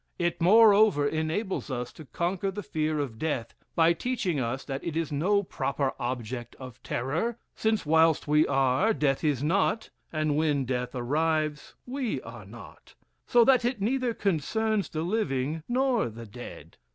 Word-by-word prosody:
It 175 0 -1
moreover 205 -5 +6
enables 160 +5 -2
us 125 -2 -4
to 155 - -11
conquer 180 +6 -2
the 205 +2 -5
fear 155 -1 -1
of 125 -6 -4
death, 130 -8 -2 0.2
by 165 0 +5
teaching 185 - -2
us 130 +2 -2
that 135 -1 -5
it 165 -2 -3
is 165 -3 -2
no 195 +8 +2
proper 140 -6 -2
object 120 -1 -4
of 130 -2 -11
terror; 160 - -2 0.2
since, 220 -3 0
whilst 160 0 +3
we 150 +1 +4
are, 135 - +2
death 140 -1 0
is 145 -4 +1
not, 195 +7 +1 0.2
and 155 -2 0
when 150 -3 +1
death 125 0 -3
arrives, 155 +4 -1
we 250 - -2
are 115 -3 -10
not: 100 -6 -14 0.3
so 240 -1 +5
that 255 -1 +5
it 240 -1 -1
neither 245 +3 0
concerns 210 +4 0
the 155 0 -3
living 160 - -1
nor 250 - +1
the 115 +1 -9
dead. 120 +4 -11
155 Hz, 160 wpm, -28 LUFS, 135-205 Hz, 0.3 s, moreover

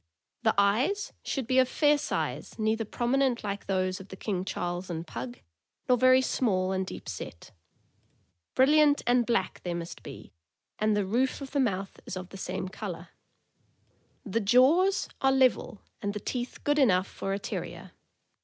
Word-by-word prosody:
The 220 -2 +2
eyes 240 - +2
should 270 -4 -3
be 255 +2 +3
of 255 -1 +4
fair 295 +1 +4
size, - - -3
neither 220 0 0
prominent 245 +2 0
like 200 -1 -4
those 185 -1 0
of 190 - -11
the 190 - -9
King 190 -2 -2
Charles 175 -1 -3
and 165 -1 -4
Pug, 125 -4 -7 0.5
nor 250 - +5
very 255 +1 +5
small 190 -8 +1
and 190 0 -1
deep - - -8
set. 85 - -7 1.0
Brilliant 290 +2 +5
and 245 -1 +3
black 235 -6 0
they 175 -1 -3
must 170 0 -6
be, - - -11 0.5
and 215 0 +2
the 205 - +1
roof 245 +7 0
of 275 -2 -8
the 285 - 0
mouth 195 -6 -1
is 185 - -4
of 185 0 -7
the 195 - -9
same 190 - -4
color. 180 -4 -7 1.2
The 220 +1 0
jaws 265 - +4
are 270 - +4
level, 260 -5 +2 0.2
and 205 -1 -2
the - - -2
teeth 245 +4 -4
good 290 +1 +2
enough 185 -9 +4
for 195 - -5
a - - 0
Terrier. - - -6
215 Hz, 170 wpm, -28 LUFS, 190-260 Hz, 1.2 s, nor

